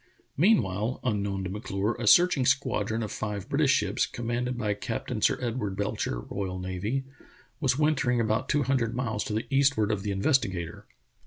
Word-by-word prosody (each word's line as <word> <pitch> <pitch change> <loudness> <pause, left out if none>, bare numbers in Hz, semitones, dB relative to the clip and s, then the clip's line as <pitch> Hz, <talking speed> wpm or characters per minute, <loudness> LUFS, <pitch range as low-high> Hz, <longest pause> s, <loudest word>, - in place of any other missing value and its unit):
Meanwhile, 120 - +2
unknown 100 -5 -1
to 95 0 -4
M*Clure, 105 -1 -2
a 120 - -2
searching 175 0 +6
squad 125 -5 +1
ron 110 +1 -1
of 105 - -4
five 105 -3 -4
British - - +2
ships, - - +2
commanded 120 +1 -3
by 105 -3 0
Captain 105 - -4
Sir - - +3
Edward 115 -5 -2
Belcher, 100 -11 -2
R.N., 95 +6 -2 0.6
was 135 -4 +1
wintering 145 -5 +2
about 110 -1 0
two 145 -1 +2
hun 135 +1 +2
dred 115 -1 -1
miles 115 -4 -1
to 105 - -3
the 110 +2 -1
eastward 135 -6 +3
of 105 -2 -1
the 105 - -3
Investigator. 100 - 0
110 Hz, 170 wpm, -28 LUFS, 100-130 Hz, 0.6 s, searching